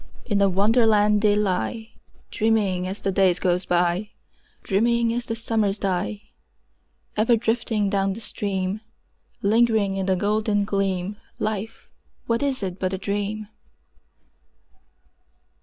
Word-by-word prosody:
In 205 -4 +1
a 200 - +5
Wonderland 210 +1 +3
they 210 -1 +4
lie, 210 +3 -1 0.4
Dreaming 210 -5 +1
as 195 +2 -5
the 195 - 0
days 185 -2 +3
go 180 -1 +1
by, 180 +3 +1 0.5
Dreaming 230 +3 +2
as 240 0 -3
the 225 - -2
summers 220 -3 0
die: 175 - -2 0.9
Ever 225 +3 +4
drifting 225 -2 0
down 195 -1 +1
the 210 - -8
stream— 195 -1 -3 0.6
Lingering 215 -2 +3
in 190 0 -2
the 190 - +3
golden 210 +1 +1
gleam— 195 0 -1 0.2
Life, 215 0 -4 0.4
what 230 +2 0
is 275 -6 0
it 185 -1 -4
but 185 0 -1
a - - -1
dream? 205 +2 -3
205 Hz, 125 wpm, -24 LUFS, 190-220 Hz, 0.9 s, a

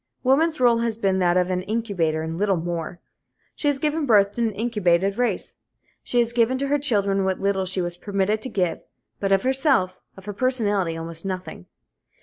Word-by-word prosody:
Woman's 305 +5 +3
rôle 240 -2 +3
has 230 -2 -1
been 195 -3 +1
that 175 -1 +2
of 180 0 +1
an 180 0 0
incubator 185 -7 -1
and 160 0 -4
little 195 +1 +1
more. 170 +1 -4 0.6
She 295 - -2
has 290 -2 +2
given 300 +1 -1
birth 200 -3 +5
to 235 - -4
an 225 -1 +1
incubated 200 -4 +1
race. 245 +1 -2 0.4
She 245 - -2
has 235 -1 +2
given 240 +2 +2
to 275 +1 -2
her 290 +1 +2
children 200 -8 +1
what 190 -1 -1
little 195 -1 0
she 185 0 0
was 175 0 -4
permitted 205 +2 -1
to 260 - -5
give, 180 -6 -1 0.4
but 195 -1 -1
of 195 -1 +3
herself, 260 - +1 0.2
of 190 - -13
her 205 - -5
personality, 205 -8 0
almost 165 0 -5
nothing. 185 - -6
200 Hz, 195 wpm, -23 LUFS, 185-240 Hz, 0.6 s, birth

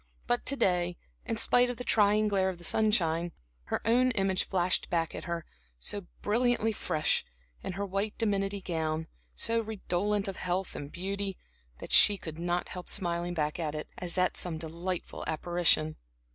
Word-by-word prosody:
But 240 0 0
to 280 - +4
day, 180 -7 +1 0.3
in 225 - -1
spite 245 +2 +4
of 245 - -4
the 250 - -5
trying 215 -2 +4
glare 195 -2 +2
of 185 - -5
the 175 - -14
sunshine, 170 -4 +2 0.3
her - - -2
own 250 +3 +4
image 195 -3 +1
flashed 185 -1 +1
back 165 -2 0
at - - -6
her, 170 -2 -3 0.3
so 185 - -5 0.2
brilliantly 235 +1 +2
fresh, 155 -7 0 0.4
in - - -4
her 200 +2 -2
white 200 +2 -2
dimity 200 -2 0
gown, 160 -2 -2 0.3
so 230 - +1
redolent 205 -1 -1
of 195 - -4
health 180 +1 -2
and 145 0 -6
beauty, 195 +2 -3 0.4
that - - -9
she 205 -1 +8
could 160 -3 -8
not 175 +1 -1
help 180 -1 -7
smiling 175 -2 0
back 150 0 -1
at 155 -2 -2
it, 150 - -5
as 180 0 -2
at 185 0 +2
some 170 -3 0
delightful 170 +3 -4
apparition. 160 -1 +2
185 Hz, 170 wpm, -30 LUFS, 170-210 Hz, 0.4 s, she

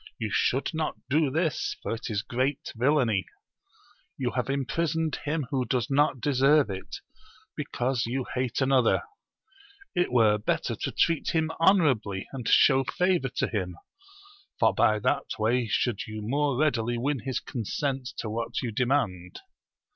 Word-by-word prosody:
You 110 -3 -3
should 135 +2 +1
not 155 -1 -2 0.2
do 150 0 +3
this, 160 +3 -1
for - - -2
it 115 +2 -5
is 105 -1 -1
great 130 +2 -2
villainy: 120 - +2 0.9
you 125 -2 -1
have 125 +2 -2
imprisoned 160 +4 -1
him 150 -1 -1
who 130 -2 +1
does 125 0 -1
not 145 -1 +2
deserve 140 0 +3
it, 95 0 -7 0.5
because 125 -1 -1
you 130 +2 -2
hate 125 0 -1
another; 135 -3 +3 0.9
it 175 -1 +1
were 110 -4 +4
better 105 - -1
to - - -3
treat 165 0 +1
him 160 0 +1
honourably, 135 - +2
and 125 -4 -5
show 135 -2 +5
favour 180 -4 +1
to - - -1
him, 90 -5 -3 0.8
for - - +4
by 110 - +3
that 105 - -1
way 115 +2 +1
should 115 +1 -1
you 110 -1 -6
more 140 +3 0
readily 120 -5 +1
win 135 +3 -1
his 130 +3 -3
consent 130 +3 -3
to - - -4
what 115 +3 -3
you 120 - -2
demand. 105 -8 -1
130 Hz, 150 wpm, -27 LUFS, 115-145 Hz, 0.9 s, show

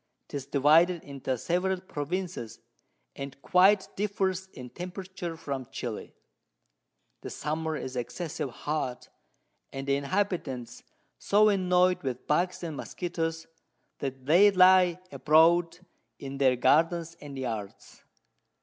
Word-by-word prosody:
'Tis 140 -2 -5
divided 160 +5 +4
into 135 -2 -4
several 180 +7 0
Provinces, 175 -6 -5 0.6
and 140 0 -7
quite 190 +2 +4
differs 190 -2 -1
in 125 -1 -9
Temperature 180 -1 -6
from 135 -5 -5
Chili. 115 -3 -6 1.1
The - - -7
Summer 155 +1 -3
is 130 -2 -6
excessive 150 +4 -4
hot, 130 0 -4 0.6
and 135 0 -6
the 140 - +3
Inhabitants 140 - -2 0.4
so 210 +1 +4
annoy'd 180 -2 +2
with 130 -3 -4
Bugs 175 +4 0
and 160 -3 -4
Muskettos, 165 0 -4 0.5
that 135 -2 -5
they 175 +8 +6
lie 185 -2 +5
abroad 165 +2 +4 0.4
in 135 0 -7
their 130 -2 +4
Gardens 165 +6 +2
and 145 -2 -8
Yards. 110 -6 -6
165 Hz, 115 wpm, -28 LUFS, 135-180 Hz, 1.1 s, they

